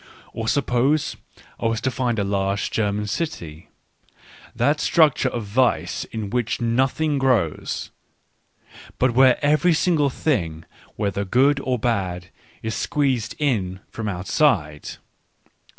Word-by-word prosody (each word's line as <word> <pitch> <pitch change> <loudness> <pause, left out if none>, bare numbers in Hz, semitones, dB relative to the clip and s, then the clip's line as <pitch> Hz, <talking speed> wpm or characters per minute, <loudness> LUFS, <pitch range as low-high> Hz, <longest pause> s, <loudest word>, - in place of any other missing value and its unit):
Or 115 -1 -4
sup 140 +4 +1
pose 135 +5 +1 0.4
I 115 - 0
were 115 0 0
to 130 +4 -1
find 125 -2 -1
a 100 - +1
large 100 0 -1
German 105 -1 -1
city 85 - -5 0.4
— - - -23
that 145 +6 +2
structure 150 -6 +3
of 120 -2 -4
vice 120 +5 0
in 110 -3 -6
which 120 -2 -1
nothing 135 +5 +1
grows, 120 - 0 1.1
but 130 -1 +2
where 130 0 +5
every 155 +4 +3
single 155 -4 +2
thing, 85 - -2 0.3
whether 100 -1 -1
good 135 +8 +3
or 130 -2 -1
bad, 95 -6 -2 0.3
is 110 0 -2
squeezed 130 -2 -1
in 100 -11 -1
from 110 -2 -5
outside. 90 - 0
120 Hz, 130 wpm, -22 LUFS, 100-135 Hz, 1.1 s, where